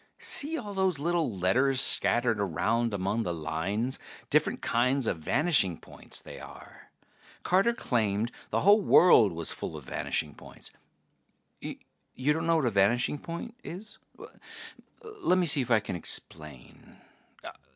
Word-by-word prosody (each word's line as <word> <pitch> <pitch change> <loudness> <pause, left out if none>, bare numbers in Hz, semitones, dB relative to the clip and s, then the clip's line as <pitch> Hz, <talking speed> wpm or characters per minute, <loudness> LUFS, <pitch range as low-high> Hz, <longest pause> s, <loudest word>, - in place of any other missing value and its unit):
See 310 +3 +1
all 210 -7 -6
those 190 -4 +1
little 165 -2 0
letters 125 +9 +2
scattered 120 -4 +2
around 110 +5 0
among 100 +3 -1
the 90 -5 -3
lines? 90 - -3 0.3
Different - - +2
kinds 125 +2 +1
of 85 - -1
vanishing 135 - +2
points, - - -9
they - - -11
are. - - -13 0.5
Carter 195 +6 +2
claimed 110 - -1 0.2
the - - 0
whole 205 +2 +6
world 120 - +6
was 85 -2 -3
full - - -5
of - - -10
vanishing - - -3
points. - - -11 0.9
You 140 +3 -4
don't 160 +2 -3
know 165 - +3
what 155 -4 +1
a 120 - +1
vanishing 115 +8 +2
point 170 +10 -7
is? 205 +5 -9 1.0
Lemme 380 - 0
see 150 -3 +3
if 125 - -5
I 115 -2 +5
can 95 - -6
explain. 75 -5 -6
125 Hz, 140 wpm, -28 LUFS, -, 1.0 s, whole